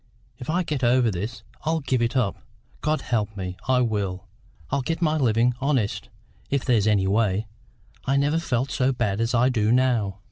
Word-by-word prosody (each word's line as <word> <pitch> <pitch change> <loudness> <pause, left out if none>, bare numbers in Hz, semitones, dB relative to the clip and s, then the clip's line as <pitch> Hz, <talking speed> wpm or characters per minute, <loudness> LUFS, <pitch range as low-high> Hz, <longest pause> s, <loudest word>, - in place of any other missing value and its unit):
If 125 - -7
I 180 +3 +1
get 150 -5 -3
over 120 -1 +4
this, 105 +5 -5 0.2
I'll 160 +1 +1
give 130 -3 0
it 120 +3 0
up 115 -6 0 0.4
God 155 +1 0
help 110 -3 -2
me, 90 -1 -4
I 130 -1 +3
will! 100 -6 -1 0.5
I'll 140 0 +1
get 165 +5 -2
my 155 -3 +2
living 120 -3 +2
honest, 115 -8 0 0.4
if 140 -2 0
there's 115 -5 +3
any 100 -3 +3
way. 105 +1 +1 0.6
I 135 +1 +2
never 145 +3 +2
felt 130 -4 -1
so 130 -1 +2
bad 110 -5 -1
as 115 +2 0
I 120 +2 +4
do 110 -3 +1
now." 120 -6 +2
120 Hz, 185 wpm, -24 LUFS, 105-135 Hz, 0.6 s, over